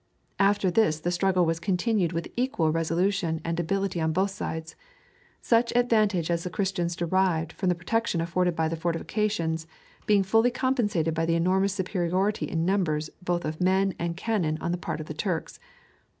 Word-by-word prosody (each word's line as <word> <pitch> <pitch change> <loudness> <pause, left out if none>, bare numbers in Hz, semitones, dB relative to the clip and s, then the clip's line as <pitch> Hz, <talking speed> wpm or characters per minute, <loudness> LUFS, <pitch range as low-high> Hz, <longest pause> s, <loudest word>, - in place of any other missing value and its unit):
After 200 -1 +3
this 175 -6 +2
the 175 +2 -1
struggle 185 0 +2
was 165 0 0
continued 190 -1 +1
with 165 -1 -3
equal 240 -11 +1
resolution 165 +1 0
and 165 0 -1
ability 190 0 -1
on 160 0 +1
both 190 +3 +1
sides; 160 -4 -5 0.7
such 235 0 +3
advantage 215 -8 +2
as 170 0 0
the 180 - -3
Christians 180 -3 -1
derived 170 -2 0
from 185 - -1
the 180 - +2
protection 185 +2 -1
afforded 175 +1 0
by 160 -1 +1
the 165 - -2
fortifications 165 0 -1 0.4
being 205 -2 +4
fully 225 +5 +3
compensated 240 - 0
by 165 +1 -1
the 165 - +2
enormous 185 +3 +2
superiority 190 +2 -1
in 165 -1 -1
numbers 160 -5 0
both 175 -1 -1
of 155 +2 -4
men 190 +1 +2
and 170 0 -2
cannon 180 -7 0
on 170 - -2
the 175 - -1
part 175 - -4
of - - -7
the 155 - -6
Turks. 170 0 -3
180 Hz, 175 wpm, -27 LUFS, 165-200 Hz, 0.7 s, being